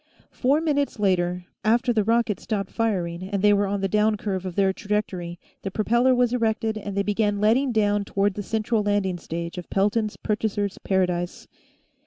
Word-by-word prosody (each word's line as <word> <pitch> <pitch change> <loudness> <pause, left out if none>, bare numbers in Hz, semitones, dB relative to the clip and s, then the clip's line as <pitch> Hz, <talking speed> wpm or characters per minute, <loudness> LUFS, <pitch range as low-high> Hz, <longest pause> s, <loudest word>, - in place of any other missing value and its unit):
Four 275 +4 +2
minutes 285 -5 0
later, 180 -3 0 0.2
after 240 +3 +2
the 215 -2 +2
rocket 230 -1 +1
stopped 200 -3 -3
firing 180 -7 -1
and 195 +1 -3
they 205 0 +6
were 200 0 +2
on 200 0 -2
the 195 - +1
down 210 +2 +2
curve 190 -2 -3
of 180 - -6
their 195 -1 +3
trajectory, 190 -4 -3 0.2
the 195 - -3
propeller 235 +5 +2
was 245 -1 +2
erected 225 -2 0
and 200 -2 -5
they 200 - +2
began 205 0 0
letting 240 +6 +3
down 205 -2 +2
toward 200 0 0
the 205 - -4
central 220 +2 0
landing 205 -3 0
stage 170 +1 -5
of 175 - -10
Pelton's 210 +2 0
Purchasers' 205 -2 -2
Paradise. 180 -2 -1
205 Hz, 180 wpm, -24 LUFS, 190-220 Hz, 0.2 s, they